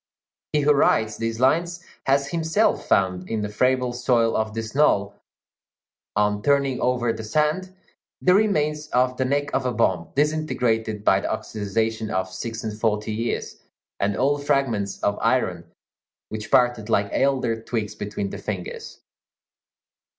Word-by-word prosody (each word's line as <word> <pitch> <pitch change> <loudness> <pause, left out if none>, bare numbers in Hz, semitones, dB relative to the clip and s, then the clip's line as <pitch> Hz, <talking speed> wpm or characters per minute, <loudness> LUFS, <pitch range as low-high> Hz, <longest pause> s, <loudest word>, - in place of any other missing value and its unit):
He 150 - +2
who 145 +1 +4
writes 110 -6 +2
these 115 0 -3
lines 170 +6 +1 0.2
has 140 +1 +2
himself 165 +6 +1
found, 90 -1 +1
in 110 -1 -1
the 105 - -3
friable 125 +3 +1
soil 120 -2 +2
of 110 0 -1
this 115 -1 -4
knoll, 100 -9 +3 1.0
on 105 0 +1
turning 140 0 +1
over 120 -2 +1
the 110 0 -7
sand, 155 - 0 0.4
the 180 - +4
remains 150 -7 +1
of 125 -2 +1
the 130 - 0
neck 140 +2 -1
of 135 - +1
a - - 0
bomb, 95 -7 0
disintegrated, 125 -8 0
by - - +4
the - - -4
oxidization 110 +1 -2
of 95 0 -2
six 115 0 -5
and 110 -1 -5
forty 105 -1 0
years, 115 +2 -3 0.4
and 100 0 0
old 140 +2 +1
fragments 125 -9 0
of 100 0 +1
iron 110 -8 0 0.6
which 110 0 -6
parted 120 -3 +3
like 100 -2 +2
elder 130 -5 +1
twigs 110 -2 -3
between 100 -1 -4
the - - -6
fingers. 95 -4 -6
115 Hz, 150 wpm, -23 LUFS, 105-140 Hz, 1.0 s, who